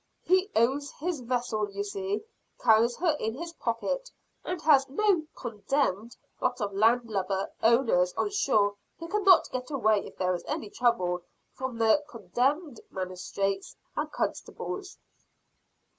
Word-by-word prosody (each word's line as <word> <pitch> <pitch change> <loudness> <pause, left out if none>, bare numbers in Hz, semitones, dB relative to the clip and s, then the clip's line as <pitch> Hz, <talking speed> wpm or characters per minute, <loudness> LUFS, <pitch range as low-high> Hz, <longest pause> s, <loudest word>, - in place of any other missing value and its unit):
"He 370 +3 +3
owns 270 +5 +2
his 340 -1 -3
vessel, 240 -4 -1
you 200 0 -3
see 200 - -3 0.4
carries 230 +1 +4
her 330 -3 +2
in 220 +1 -2
his 335 +4 -6
pocket - - -2 0.3
and 360 - -3
has 275 -3 +5
no 350 0 +2
condemned 230 -1 -1 0.2
lot - - 0
of 205 -3 -2
land 230 +4 +3
lubber 195 -2 -1
owners 225 -6 +4
on 410 - 0
shore 210 - +2 0.2
who 330 - -7
cannot 390 -1 +5
get 255 0 -4
away 220 -8 +2
if - - -14
there 185 0 +1
is 175 - -4
any 205 - -3
trouble, 180 -8 +1 0.3
from 260 -2 -5
the 230 +6 +4
condemned 250 - -1
magistrates 190 +1 -3 0.2
and - - -2
constables." 380 +1 -4
235 Hz, 140 wpm, -28 LUFS, 205-300 Hz, 0.4 s, has